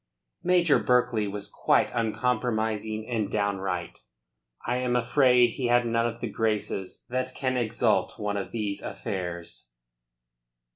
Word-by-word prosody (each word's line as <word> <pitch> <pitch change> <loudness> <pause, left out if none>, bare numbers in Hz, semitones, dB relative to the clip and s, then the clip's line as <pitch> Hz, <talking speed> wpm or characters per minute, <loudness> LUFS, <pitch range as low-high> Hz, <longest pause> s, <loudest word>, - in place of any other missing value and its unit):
Major 175 -4 +4
Berkeley 120 -4 +2
was 100 0 -5
quite - - +2
uncompromising 110 -2 -1
and 110 -5 -1
downright. 95 -4 -2 0.7
I 120 +1 0
am 125 -1 0
afraid 125 0 +4
he 125 +1 -2
had 120 0 +4
none 115 0 +1
of 115 0 -6
the 120 - -1
graces 105 -3 -2
that 130 +1 -2
can 130 -1 -1
exalt 115 -2 +1
one 105 -1 -2
of 100 - -4
these 105 -3 -3
affairs. 85 -8 -5
115 Hz, 130 wpm, -27 LUFS, 105-125 Hz, 0.7 s, Major